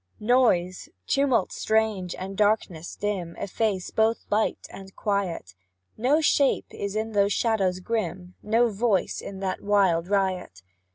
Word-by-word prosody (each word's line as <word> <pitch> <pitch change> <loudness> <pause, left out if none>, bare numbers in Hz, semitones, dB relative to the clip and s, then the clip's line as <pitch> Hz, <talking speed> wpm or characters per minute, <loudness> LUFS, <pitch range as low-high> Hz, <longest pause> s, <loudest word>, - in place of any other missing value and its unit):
Noise, 210 -7 +2 0.2
tumult 265 -8 +2
strange, 215 -5 0
and 190 +1 -6
darkness 205 -5 0
dim, 190 -5 -3
Efface 200 -2 -2
both 220 +1 +1
light 215 +1 0
and 195 0 -11
quiet; 190 - -2 0.4
No 275 +7 +2
shape 280 -2 +2
is 200 0 -5
in 220 +1 -2
those 200 -1 +2
shadows 195 -6 +1
grim, 180 -4 -3
No 230 +2 +2
voice 205 -2 0
in 195 -1 -8
that 190 -1 -2
wild 190 -5 +2
riot. 185 - -1
200 Hz, 130 wpm, -25 LUFS, 185-220 Hz, 0.4 s, Noise